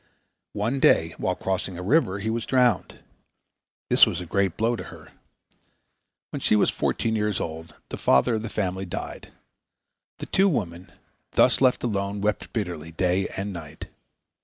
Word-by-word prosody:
One 115 +6 -1
day 80 -9 +4
while 90 - 0
crossing 95 -1 -3
a 90 - -6
river 100 - +2
he 110 +2 -2
was 115 0 -3
drowned. 125 -6 +1 0.8
This - - +6
was 85 - -2
a 90 - -6
great 95 +1 0
blow 115 +2 +1
to - - -7
her. - - -13 1.2
When - - -4
she - - +3
was 105 - +3
fourteen 110 -1 -1
years 105 -2 0
old 80 -1 -6
the - - -5
father 65 - +3
of 110 - -1
the 115 - -5
family 95 -2 -2
died. - - -6 0.9
The - - -6
two 195 +1 +3
women, 90 - -3 0.4
thus - - +4
left 130 -2 +3
alone, 100 -3 -2
wept 105 -1 -1
bitterly 85 -7 -4
day 90 +3 +1
and 100 +1 -3
night. 80 -4 -9
100 Hz, 160 wpm, -25 LUFS, 90-110 Hz, 1.2 s, This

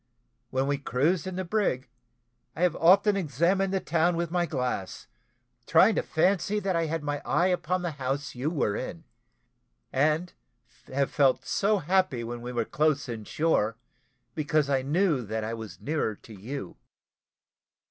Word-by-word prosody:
When 130 +1 0
we 140 0 0
cruised 155 +8 0
in 185 - -4
the 185 0 -3
brig, 170 -10 0 0.7
I 165 - -1
have 180 -2 +3
often 200 +5 +5
examined 185 +3 +1
the 195 - +1
town 170 0 +1
with 170 -1 -2
my 175 -1 +1
glass, 125 - -3 0.6
trying 190 +7 +6
to - - +1
fancy 195 +5 +1
that 195 -3 -1
I 165 -1 +1
had 160 0 -3
my 145 -1 -2
eye 180 +2 +2
upon 180 0 0
the 175 - -1
house 135 +2 -2
you 130 +5 -2
were 140 -11 0
in; 160 +7 -5 0.9
and 155 +6 +1 0.5
have 135 +1 -1
felt 135 -2 +3
so 205 +1 +2
happy 180 -7 +1
when 120 +1 -5
we 120 +1 -5
were 120 -2 -1
close 150 +1 +1
in 115 -3 -6
shore, 115 -9 +1 0.6
because 155 -2 +1
I 135 -1 +2
knew 155 +1 +1
that 110 0 -3
I 110 +1 -3
was 110 -2 -8
nearer 145 -7 -1
to 110 - -14
you." 105 +1 -7
155 Hz, 165 wpm, -27 LUFS, 130-180 Hz, 0.9 s, trying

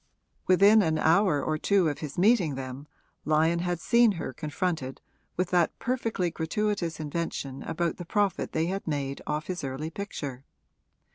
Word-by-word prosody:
Within 200 +4 +6
an 160 -4 +1
hour 165 -2 +3
or 155 0 -1
two 195 -2 +3
of 145 - -2
his 150 -3 -6
meeting 185 - +3
them 130 +2 -7 0.4
Lyon 160 +2 +2
had 175 -1 -1
seen 235 +2 +4
her 165 -7 -5
confronted 155 -2 -3 0.4
with 180 0 -1
that 175 -2 +2
perfectly 230 -8 -1
gratuitous 170 0 -2
invention 150 -3 -4
about 170 +1 -2
the 175 - -7
profit 205 +1 0
they 160 0 0
had 190 +2 -3
made 140 -3 -2
off 150 +1 -2
his 180 -3 -4
early 135 +4 -4
picture. 145 -9 -6
165 Hz, 155 wpm, -28 LUFS, 150-190 Hz, 0.4 s, Within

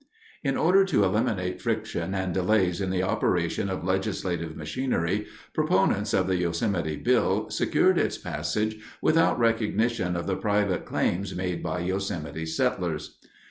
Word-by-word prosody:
In 135 -2 0
order 190 +4 +5
to 190 - +2
eliminate 95 -3 0
friction 110 -5 -2
and 95 -2 -1
delays 95 -1 +2
in 95 - -1
the 95 0 0
operation 90 0 0
of 95 - -3
legislative 90 -3 -2
machinery, 100 - -1 0.3
proponents 95 +2 +2
of 95 - +2
the 95 -1 +1
Yosemite 85 -1 -1
bill - - +1
secured - - +3
its - - 0
passage 110 0 -2 0.2
without 165 +1 +3
recognition 115 -4 +1
of 85 - -2
the 95 - 0
private 100 -3 0
claims 95 +2 -1
made 90 -1 -2
by 90 - -2
Yosemite 85 -4 -3
settlers. 80 -1 -2
95 Hz, 140 wpm, -26 LUFS, 90-110 Hz, 0.3 s, order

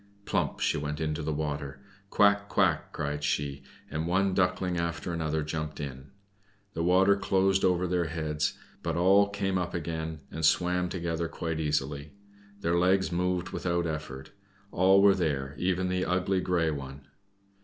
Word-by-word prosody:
Plump - - -1
she - - +1
went 75 0 -4
into 75 -1 -2
the 75 +1 -2
water. 75 -2 -3 0.3
"Quack! 100 0 +3
quack!" - - +1
cried 75 -1 -3
she, 70 -1 -1 0.3
and 80 +2 -3
one 95 +2 +2
duckling 90 -1 +1
after 85 +1 -3
another 80 -2 -1
jumped 75 0 -4
in. 70 -2 -6 0.7
The 80 - -3
water 95 +3 +4
closed 95 -1 +2
over 90 -1 +2
their 90 -1 0
heads, 75 -2 -2 0.2
but 85 -1 -2
all 100 +3 +5
came 95 -2 -1
up 90 -1 -3
again, 80 -1 -4
and 80 - -5
swam 90 +3 +2
together 85 -2 -2
quite 80 -1 -4
easily. 75 -1 -2 0.5
Their 85 0 +1
legs 95 +1 +2
moved 90 +1 0
without 85 -1 -1
effort. 75 -3 -5 0.4
All 95 +2 +5
were 100 -1 +7
there, 70 -7 -1
even 90 0 0
the 90 0 0
ugly 90 +1 +1
grey 85 -3 +1
one. 70 -1 -6
85 Hz, 155 wpm, -29 LUFS, 75-90 Hz, 0.7 s, were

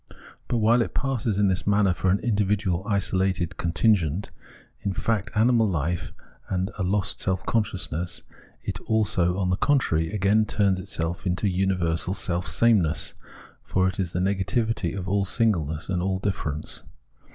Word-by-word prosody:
But 120 - 0
while 115 +2 +4
it - - -3
passes 120 -6 0
in 100 -1 +3
this 95 0 -1
manner 100 -2 +3
for 95 +2 0
an 95 - +4
individual, 100 -4 0
isolated, 95 -3 0
contingent, 90 -1 +1 0.5
in 100 - -2
fact 105 0 -1
animal 115 0 +4
life, 80 -3 -2 0.4
and 95 +2 -1
a - - -1
lost 95 +1 0
self 95 -1 -1
consciousness, 90 -6 -1 0.4
it - - -4
also, 95 -5 +1
on 90 -2 0
the 90 - +1
contrary, 80 - +1
again 105 +1 +2
turns 100 -3 +1
itself 85 0 -3
into 90 +4 0
universal 90 -1 0
self 90 -2 -1
sameness; 100 -10 +2 0.5
for 95 0 +1
it 95 0 -3
is 90 -3 -1
the 90 - -2
negativity 100 +4 0
of 95 -1 -4
all 100 +1 +1
singleness 90 - 0
and 90 -2 -1
all 95 +1 0
difference. 80 -6 -3
95 Hz, 150 wpm, -25 LUFS, 90-105 Hz, 0.5 s, while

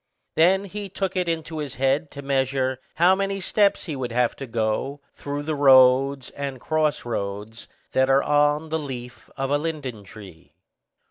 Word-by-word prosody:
Then 185 +5 +4
he 200 +1 -6
took 195 0 -3
it 180 -1 0
into 160 -1 -3
his 145 -3 -5
head 135 +4 +1
to 140 - -9
measure 130 -1 0 0.2
how 175 +3 +5
many 195 0 -1
steps 200 +1 +2
he 160 -6 -5
would 125 -3 -4
have 120 0 +1
to 135 - -6
go 115 +5 -2
through 145 0 -5
the 155 +1 -2
roads 135 -1 +5
and 140 -2 -5
cross 155 0 0
roads 105 0 -5 0.2
that 130 0 +2
are 135 +1 +4
on 150 +1 +2
the 160 +1 -1
leaf 125 -4 -8
of 135 0 -2
a 145 - +2
linden 145 -9 -5
tree. 90 -7 -14
140 Hz, 175 wpm, -24 LUFS, 125-160 Hz, 0.2 s, how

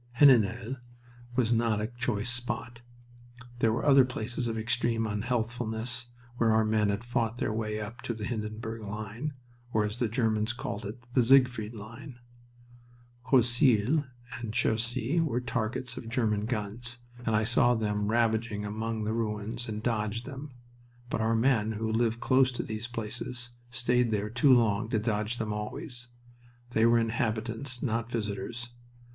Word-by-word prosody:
Heninel 120 -2 +5 0.6
was 120 -2 +3
not 115 -2 +2
a 105 - 0
choice 120 -2 -1
spot. 120 -1 -3 0.8
There 115 -2 +3
were 115 - -1
other 135 -2 +7
places 120 0 -2
of 115 -1 -2
extreme 115 0 +1
unhealthfulness 115 +2 -2 0.3
where 115 -2 +3
our 110 0 +4
men 110 -1 +2
had 100 +3 -1
fought 120 -1 -1
their 110 - -1
way 110 -1 -2
up 105 +2 -7
to 115 - -3
the 105 -1 -4
Hindenburg 110 0 -4
line, 110 +7 -5 0.4
or, 110 -2 +2
as 105 +2 -4
the 120 - +1
Germans 110 -1 +1
called 105 -3 -4
it, 115 +4 -8
the 125 - +5
Siegfried 125 -3 +4
line. 115 +5 -9 1.1
Croisille 125 +2 +4 0.3
and 115 -2 -4
Cherisy 120 +6 +1
were 125 -7 0
targets 120 0 -2
of 115 - -6
German 110 -3 +1
guns, 120 +2 -2 0.2
and 110 -2 +1
I 105 - +3
saw 120 +2 +4
them 105 -2 0
ravaging 110 -2 +1
among 110 +1 -3
the 110 +1 -1
ruins, 110 +1 -3
and 110 0 -4
dodged 115 0 -1
them. 140 +1 -7 0.6
But - - 0
our 115 +1 +2
men, 115 -2 +2
who 110 +1 -2
lived 115 0 +1
close 130 +1 +4
to - - -2
these 110 +1 -4
places, 120 +1 -4 0.2
stayed 125 -1 +2
there 105 -1 -1
too 120 +4 +4
long 115 -3 +4
to 115 - +1
dodge 110 +1 -1
them 110 -2 -2
always. 120 +4 -4 0.6
They 115 0 +4
were 120 0 +5
inhabitants, 115 +2 -1
not 115 -2 -1
visitors. 115 +2 -3
115 Hz, 155 wpm, -29 LUFS, 110-120 Hz, 1.1 s, other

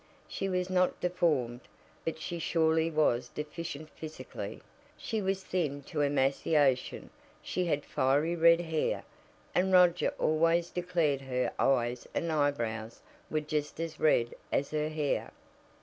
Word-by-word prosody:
She 195 - -3
was 180 -1 0
not 185 0 +2
deformed, 150 -9 0 0.4
but 165 - -2
she 170 +2 -4
surely 160 0 +2
was 125 -6 +1
deficient 155 0 -6
physically. 155 -1 -7 0.4
She 220 -2 -2
was 190 0 -1
thin 150 -7 -2
to 150 +1 -3
emaciation, 140 -1 +1 0.3
she 180 - -1
had 145 -4 0
fiery 145 +6 +1
red 170 0 +6
hair, 160 -2 -1 0.5
and 190 +1 +2
Roger 180 -1 +5
always 165 +2 +2
declared 170 -6 0
"her 125 -1 -1
eyes 120 -2 +1
and 170 -1 0
eyebrows 115 -7 -1 0.3
were 155 - 0
just 150 0 -3
as 165 -1 -4
red 120 -6 +3 0.2
as 140 - 0
her 155 0 0
hair." 155 -2 -1
155 Hz, 135 wpm, -31 LUFS, 140-170 Hz, 0.5 s, red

